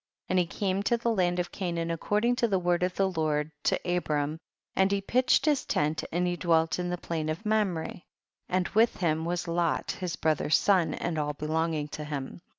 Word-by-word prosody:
27. - - -2
And 185 - +4
he - - -11
came 195 -1 +1
to 235 +4 +2
the 235 0 0
land 180 -3 +1
of 175 -1 -2
Canaan 170 -3 -2
according 210 +8 +1
to 235 - +2
the 195 -3 +1
word 175 -1 +1
of 180 0 0
the 195 - +2
Lord 155 -4 -1
to - - +2 0.2
Abram, 150 -2 -1 0.4
and 190 +1 +3
he 200 - +2
pitched 255 +6 +2
his 295 -3 +2
tent 150 +1 0
and 175 +2 +1
he 175 0 0
dwelt 165 -1 +2
in 180 0 -2
the 180 - -2
plain 160 -3 -3
of 165 +8 -4
Mamre, 205 -7 0 0.5
and 185 0 +1
w^ith 225 +3 +3
him 160 -2 0
was 175 0 -2
Lot 170 -1 0
his 180 -2 -4
brother's 155 -1 +2
son, 180 -6 +2
and 165 -2 -2
all 150 0 -1
belonging 155 0 -1
to 150 - -6
him. 145 +1 -5
175 Hz, 210 wpm, -28 LUFS, 160-190 Hz, 0.5 s, And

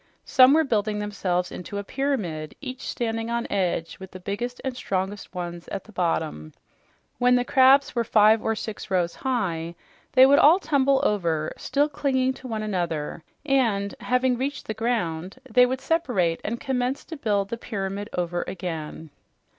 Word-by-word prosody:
Some 260 +2 +6
were 320 - +4
building 215 -6 0
themselves 185 -4 -2
into 190 +3 -6
a 200 - -3
pyramid, 200 - -2
each 260 -2 -7
standing 225 -1 -2
on 235 0 -1
edge, 180 -4 -1
with 190 -1 -9
the 185 - -10
biggest 240 +7 -4
and 265 -2 -3
strongest 195 -3 -3
ones 175 -1 -5
at 195 - -5
the 220 - -16
bottom. 160 - -2 0.7
When 250 0 +5
the 245 0 +1
crabs 265 +2 +5
were 235 - +1
five 220 0 +5
or 225 - 0
six 215 0 -6
rows 180 -3 +1
high, 175 -10 -2 0.4
they 260 0 +8
would 280 +1 +6
all 315 +5 +7
tumble 275 -6 +2
over, 165 -6 0
still 290 +1 0
clinging 270 -3 0
to 260 - -8
one 220 -3 -3
another 170 -6 -3 0.2
and, 230 -8 +1
having 250 0 +1
reached 280 +2 -3
the 215 - -3
ground, 195 -6 -2
they 250 -1 +5
would 260 +1 -3
separate 245 - 0
and 235 +2 -3
commence 260 0 -2
to 325 - -7
build 205 -7 0
the 235 - -3
pyramid 200 -1 -4
over 175 0 -1
again. 160 -4 -6
215 Hz, 170 wpm, -25 LUFS, 180-255 Hz, 0.7 s, they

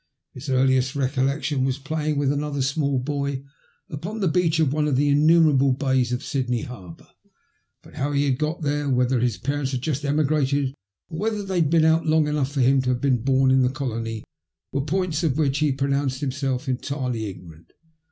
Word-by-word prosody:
His 135 +3 -9
earliest 130 +1 +2
recollection 135 +1 0
was 130 0 0
playing 150 +1 -2
with 140 -1 +1
another 145 -1 -2
small 140 0 0
boy 140 0 -2 0.4
upon 180 +10 -6
the 195 - +1
beach 165 -1 +1
of 145 -4 +2
one 150 0 +1
of 145 - +1
the 145 +2 +3
innxmierable 145 -3 +4
bays 130 -3 +1
of 125 - -2
Sydney 125 -4 -2
harbour; 95 -9 -10 0.8
but - - -16
how 145 +2 -2
he 140 0 +1
had 130 -3 0
got 155 +2 -2
there, 145 0 -1
whether 125 -1 +2
his 120 0 0
parents 140 0 -2
had 125 -1 -3
just 145 -1 -2
emigrated, 145 -2 +1 0.4
or 160 -2 -6
whether 210 0 -1
they 190 -3 -1
had 150 - +2
been 160 0 +4
out 160 +1 +3
long 155 -1 +3
enough 150 -2 -1
for 140 -2 -1
him 135 +2 +4
to 130 - -2
have 125 -1 0
been 130 -4 +1
bom 130 +1 +3
in 130 0 +4
the 125 - +3
colony 115 -5 -4 0.5
were 140 - -1
points 165 +1 -1
of 155 -5 0
which 145 -3 +1
he 150 -2 +2
pronounced 140 -1 -1
himself 135 -1 -2
entirely 130 -3 -2
ignorant. 85 -4 -12
140 Hz, 195 wpm, -23 LUFS, 130-150 Hz, 0.8 s, innxmierable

